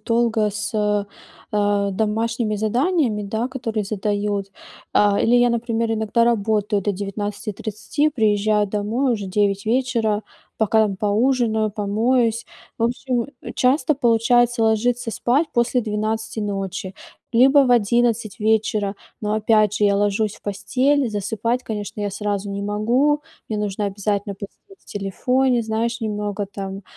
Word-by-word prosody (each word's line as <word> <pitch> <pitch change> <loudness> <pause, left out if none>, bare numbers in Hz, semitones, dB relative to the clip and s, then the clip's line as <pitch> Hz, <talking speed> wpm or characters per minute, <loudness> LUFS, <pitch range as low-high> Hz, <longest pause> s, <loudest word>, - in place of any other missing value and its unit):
долго 230 -1 +1
с, 210 +2 -4
э, 210 -1 +1 0.5
э, 205 -1 +1
домашними 220 +2 -1
заданиями, 235 - +1
да, 220 +4 -2
которые 230 -5 -3
задают, 205 -1 -2 0.4
а, 205 -1 +4
или 235 - +3
я, 245 0 +4
например, 230 -1 -1
иногда 220 +1 +1
работаю 210 -2 +1
до 205 - 0
19:30, 205 +6 -3
приезжаю 210 -4 +2
домой, 220 +6 0
уже 205 -3 -5
9 200 +1 0
вечера, 230 -3 +1 0.4
пока 220 0 +3
поужинаю, 220 +2 +1
помоюсь. 225 +3 +1 0.3
В 230 - +1
общем, 245 0 -1 0.2
э, - - -7
часто 280 +4 +2
получается 240 -1 +3
ложиться 235 +2 +1
спать 275 +8 +1
после 240 +1 +2
12 220 +1 -3
ночи 195 -2 -4 0.4
либо 265 +4 +6
в 265 -2 +3
11 235 -2 +2
вечера, 215 -2 +1 0.2
но, 210 0 -1
опять 215 -1 +3
же, 210 - +2
я 200 -1 +3
ложусь 205 +1 0
в - - -22
постель- 260 +7 +1
засыпать, 220 +4 -1
конечно, 210 -1 -5
я 205 -1 -1
сразу 200 0 -3
не 200 0 -4
могу. 240 +9 +1 0.3
Мне 215 - -2
нужно 205 0 -2
обязательно 200 0 -2
посидеть 200 0 -10 0.2
в - - -30
телефоне, 245 +5 0
знаешь, 225 +1 -2
немного 210 -2 -3
там, 195 0 -6
215 Hz, 135 wpm, -21 LUFS, 205-235 Hz, 0.5 s, либо